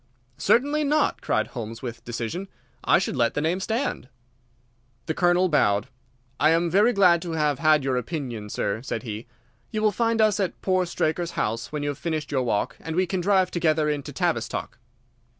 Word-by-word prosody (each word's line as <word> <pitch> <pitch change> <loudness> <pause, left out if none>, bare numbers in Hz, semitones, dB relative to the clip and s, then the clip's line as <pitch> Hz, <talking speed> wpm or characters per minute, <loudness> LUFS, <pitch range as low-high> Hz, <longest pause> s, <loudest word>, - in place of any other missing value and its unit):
"Certainly 290 +5 +3
not," 300 +2 +1
cried - - 0
Holmes, 115 -1 -7
with 120 -1 -6
decision. 120 - -4 0.4
"I - - +5
should 185 - -2
let 120 -2 +1
the - - +1
name 165 +4 0
stand." 220 - -2 1.0
The 160 - -1
Colonel 175 +2 +3
bowed. 105 - +2 0.5
"I 155 - +5
am 165 +1 +2
very 205 +6 +5
glad 180 -6 +4
to 170 -2 -5
have 150 -4 0
had 155 -2 +4
your 130 -2 0
opinion, 125 -6 -4
sir," 100 +2 -2
said 130 - -4
he. 110 -1 -6 0.4
"You 215 0 -2
will 215 - +4
find 230 +2 0
us 215 -2 +3
at 190 -3 -2
poor 185 -1 +1
Straker's 170 +1 -1
house 115 +2 -2
when 150 -1 -3
you 145 - -1
have 145 0 -5
finished 155 -3 -3
your 135 -2 +1
walk, 115 -5 -1
and 160 0 -5
we 185 +1 +3
can 185 +1 -2
drive 190 -1 +2
together 155 -3 +1
into 145 -2 -4
Tavistock." - - -2
160 Hz, 185 wpm, -25 LUFS, 130-185 Hz, 1.0 s, I